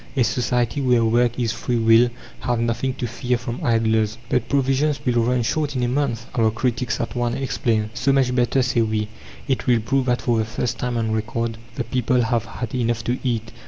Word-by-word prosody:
A 130 - +5
society 125 +3 0
where 125 -3 +3
work 120 +2 +2
is 115 -2 +1
free 120 +2 -2
will 115 +1 +5 0.3
have 120 -2 -1
nothing 115 +3 -1
to - - -3
fear 120 +1 -1
from 120 0 -6
idlers. 110 -2 +2
"But 125 -1 0
provisions 140 +1 +1
will 120 -2 +2
run 125 +1 +1
short 145 +3 -1
in 125 - 0
a - - +2
month!" 125 -3 -1
our 115 -2 +3
critics 125 +2 -1
at 115 - -3
once 120 -1 0
exclaim. 120 -5 -1
"So 130 +3 +1
much 135 -1 +4
the 125 - -2
better," 125 +1 +2
say 120 -1 +1
we. 110 -1 -1 0.4
It 130 -2 -1
will 120 -2 +4
prove 130 +4 0
that 125 -1 +1
for 120 -2 +2
the 110 - +1
first 115 +2 -3
time 125 -1 -1
on 110 -1 0
record 115 +1 -2 0.2
the - - -2
people 125 0 0
have 115 -1 0
had 115 0 -6
enough 120 -2 0
to 125 +2 -1
eat. 115 -3 -2
120 Hz, 215 wpm, -22 LUFS, 115-125 Hz, 0.4 s, A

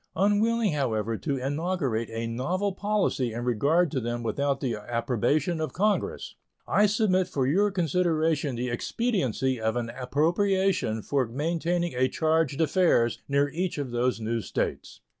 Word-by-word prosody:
Unwilling, 210 +2 +2
however, 115 -6 -1
to 140 +4 -2
inaugurate 140 -4 -1
a 115 +1 -3
novel 170 - -1
policy 200 - 0
in 120 +1 -4
regard 145 +9 +2
to 140 - -1
them 120 0 -3
without 140 +5 0
the 130 -4 -1
approbation 120 - -1
of 155 - -3
Congress, 210 +3 -1 0.3
I 210 - +4
submit 195 -3 +2
for 140 -8 -1
your 195 +10 +3
consideration 165 -5 0
the 125 +1 -2
expediency 130 - -1
of 110 +1 0
an 120 -1 -2
appropriation 165 - +1
for 135 -4 0
maintaining 170 +6 -1
a 130 +1 +2
charge 160 -3 +1
d'affaires 160 -7 +2
near 140 +1 +2
each 175 +3 -2
of 140 -4 -3
those 120 0 0
new 115 +1 -2
States. - - -4
145 Hz, 145 wpm, -27 LUFS, 120-180 Hz, 0.3 s, I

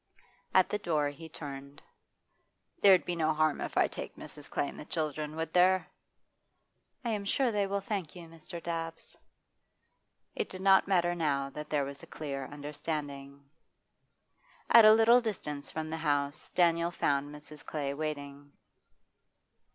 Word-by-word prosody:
At 185 - +6
the 210 - -1
door 155 -6 0
he 160 +3 -10
turned. 140 -2 -8 1.0
'There'd 190 -3 +7
be 175 - -2
no 160 -1 +1
harm 155 -1 +1
if - - -4
I - - +5
take - - -7
Mrs. 150 - -11
Clay 145 - -1
and - - -9
the - - -6
children, 155 -1 -3
would 160 0 -4
there?' 185 +1 +4 1.1
'I - - 0
am 210 -2 -2
sure 250 +4 +1
they 205 -2 0
will 200 0 -1
thank 195 -6 -4
you, 175 - -9
Mr. 165 +1 -9
Dabbs.' 165 -1 -5 1.2
It - - -3
did 185 - -7
not 195 -1 +5
matter 175 -3 +2
now 140 -5 -1
that 150 +2 -7
there 145 -2 +1
was 140 0 -8
a - - -12
clear 140 -3 -5
understanding. 145 -1 -6 1.2
At 230 -2 +9
a 215 - +10
little 230 +2 +6
distance 150 -10 -4
from 155 0 -4
the 160 - -2
house 145 -2 -1
door - - -34
Daniel 170 0 +1
found 145 -4 0
Mrs. 150 0 -12
Clay 140 -3 -3
waiting. 145 -1 -5
155 Hz, 160 wpm, -31 LUFS, 145-180 Hz, 1.2 s, a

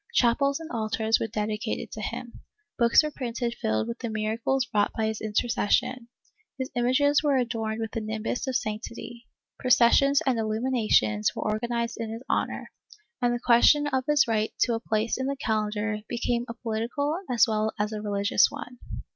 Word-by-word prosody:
Chapels 275 +4 +3
and 325 -1 -9
altars 220 -1 0
were - - -1
dedicated 215 +1 -3
to 215 - -6
him, 235 +3 -6 0.4
books 235 +5 +6
were 305 - -2
printed 240 -3 -3
filled 110 0 0
with 115 - -5
the 235 - -4
miracles 220 +4 -1
wrought 205 -1 +2
by 220 - +1
his 220 0 -3
intercession, 230 +2 0 0.5
his 260 0 -4
images 260 +4 +3
were 290 -3 +2
adorned 225 -3 -2
with 225 -1 -3
the 225 - -3
nimbus 220 +4 -3
of 260 - -2
sanctity, 235 +2 -5 0.3
processions 255 +3 +5
and 255 -4 +1
illuminations 215 - +1
were - - -3
organized 235 +2 -2
in 225 -1 -3
his 225 +3 -7
honor, - - -2 0.5
and 245 -1 +2
the 240 - -1
question 250 +5 +5
of 265 -3 0
his 295 -3 +4
right 220 -1 0
to 240 - +3
a 225 - -1
place 225 +1 -1
in 260 - -1
the 280 - -1
calendar 215 -2 -1
became 240 0 -1
a 235 - -5
political 245 +7 -2
as 240 -1 +4
well 215 0 0
as 210 +1 -1
a 210 - -4
religious 200 -1 +2
one. 245 -1 -9
230 Hz, 175 wpm, -26 LUFS, 215-250 Hz, 0.5 s, books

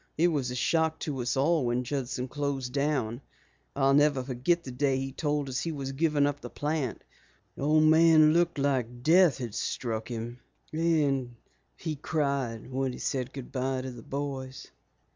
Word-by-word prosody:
It 170 +3 +4
was 140 -6 -1
a 125 - -4
shock 160 +4 +1
to 140 -4 -3
us 125 +3 -1
all 145 -1 +2
when 120 +1 0
Judson 130 -1 -3
closed 135 -2 -3
down. 140 -4 0 0.5
I'll 135 0 +3
never 145 -2 +4
forget 135 +7 0
the 130 - -7
day 135 +1 +1
he 135 0 -3
told 145 0 -1
us 130 0 -2
he 165 - -2
was 135 -3 -4
giving 150 0 +2
up 145 0 -2
the - - -7
plant. 145 -5 -2 0.5
The - - -9
old 155 +2 +4
man 155 -1 +6
looked 170 -1 +2
like 125 -4 -1
death 170 +1 +5
had 120 -5 -5
struck 110 0 -3
him, 120 +1 -5 0.3
and 145 -6 +1 0.4
he 155 -3 -4
cried 140 -6 -2
when 130 0 -1
he - - -7
said 130 -1 -2
good 135 -3 -8
bye 130 0 -1
to 130 - -5
the 120 -2 -10
boys." 135 0 -5
135 Hz, 180 wpm, -28 LUFS, 125-150 Hz, 0.5 s, man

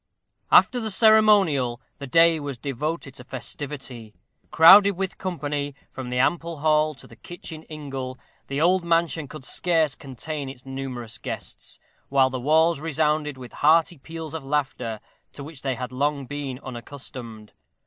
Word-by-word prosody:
After 250 - +6
the 220 -2 -3
ceremonial, 200 - +4 0.2
the 140 - -6
day 165 +3 +5
was 140 -3 -5
devoted 140 +3 -4
to 130 - -11
festivity. 125 -3 -7 0.3
Crowded 200 +5 +8
with 190 0 -4
company, 145 -6 -3 0.2
from 130 -2 -7
the 125 - -2
ample 165 +5 0
hall 155 0 +2
to - - -14
the - - -15
kitchen 165 -2 -9
ingle, 135 -4 -6 0.3
the 140 +1 -3
old 180 +3 +3
mansion 165 -2 +1
could 135 -1 -10
scarce 160 -4 +1
contain 140 +2 -6
its 130 -1 -11
numerous 130 -4 -6
guests, - - -8 0.3
while 135 -1 +3
the 130 -1 -4
walls 160 +3 +3
resounded 150 -2 0
with 125 -2 -10
hearty 160 +1 +3
peals 160 +2 -8
of 160 -3 -5
laughter, 135 -6 -2 0.3
to 140 - -9
which 150 -1 -10
they 135 -2 -1
had 125 0 -5
been 125 - -8
long 140 -2 -2
unaccustomed. 120 -4 -9
145 Hz, 150 wpm, -24 LUFS, 130-165 Hz, 0.3 s, Crowded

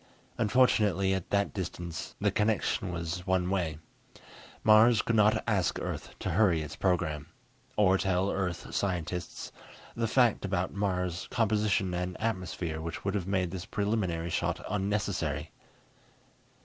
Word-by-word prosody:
Unfortunately, 105 -5 +3
at 95 -2 -3
that 100 0 +1
distance, 85 -3 -5
the - - +2
connection 105 -3 0
was 85 +2 -4
one 95 -1 +1
way. 85 -6 -1 0.9
Mars 110 +1 +6
could 115 - 0
not 105 0 +4
ask - - +1
Earth - - -5
to - - -3
hurry 85 -5 +3
its 75 - -7
program. 80 -5 0 0.5
Or 95 -2 +4
tell 95 +1 +1
Earth 90 -4 -3
scientists 90 -2 -3 0.4
the 115 -1 0
facts 120 -1 +3
about 95 -2 -1
Mars' 90 -3 -1
composition 105 -4 +1
and 90 +1 -3
atmosphere 90 -7 -2
which 85 +3 -6
would 100 - 0
have 95 -3 -2
made 95 -3 0
this 95 -1 -6
preliminary 95 -6 -1
shot - - -1
unnecessary. 95 -7 -1
95 Hz, 135 wpm, -30 LUFS, 85-105 Hz, 0.9 s, Mars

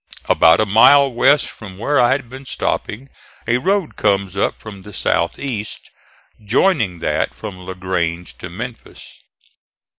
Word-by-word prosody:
About 80 0 +5
a 110 - +3
mile 135 +7 +6
west 140 +4 +3
from 95 -4 -11
where 145 +8 +1
I 120 +1 +4
had 135 -3 -4
been 130 +3 -11
stopping 130 +1 -3 0.4
a 120 +2 +2
road 190 +2 0
comes 100 -2 0
up 100 - -1
from 100 -3 -10
the 105 +2 -12
southeast, 105 +5 -2 0.5
joining 110 - +1
that - - -1
from 100 -4 -8
La 95 +1 -8
Grange 90 -2 -3
to - - -7
Memphis. 115 +7 -9
110 Hz, 145 wpm, -18 LUFS, 95-130 Hz, 0.5 s, mile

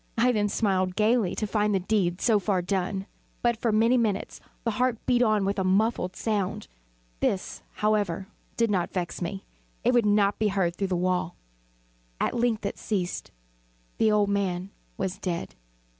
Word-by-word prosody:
I 245 +2 +4
then 210 -3 +1
smiled 185 -4 +1
gaily, 215 -2 +2
to 215 - -1
find 210 0 +1
the - - +2
deed 185 -2 0
so 220 -3 +4
far 190 -2 0
done. 190 +1 -1 0.4
But, 240 -1 +3
for 230 0 0
many 230 +4 +4
minutes, 215 -4 -1 0.2
the 230 - 0
heart 245 +2 +1
beat 245 -1 +3
on 215 -4 +3
with 200 +1 0
a - - +1
muffled 190 0 +1
sound. 205 - -2 0.5
This, 190 - -1
however, 205 -4 0 0.3
did 230 -2 +2
not 180 -3 0
vex 180 -2 -3
me; 190 +3 -4 0.4
it 245 - +3
would 240 -3 +4
not 205 -1 +3
be 215 - +3
heard 190 -4 0
through 195 - -1
the 185 - -1
wall. 180 -1 0 0.8
At - - 0
length 235 -3 0
it 200 - -3
ceased. 185 -5 -2 0.7
The 220 -1 +4
old 210 -1 +3
man 190 -1 -1 0.3
was 190 0 -3
dead. 175 -4 -3
205 Hz, 175 wpm, -27 LUFS, 185-220 Hz, 0.8 s, I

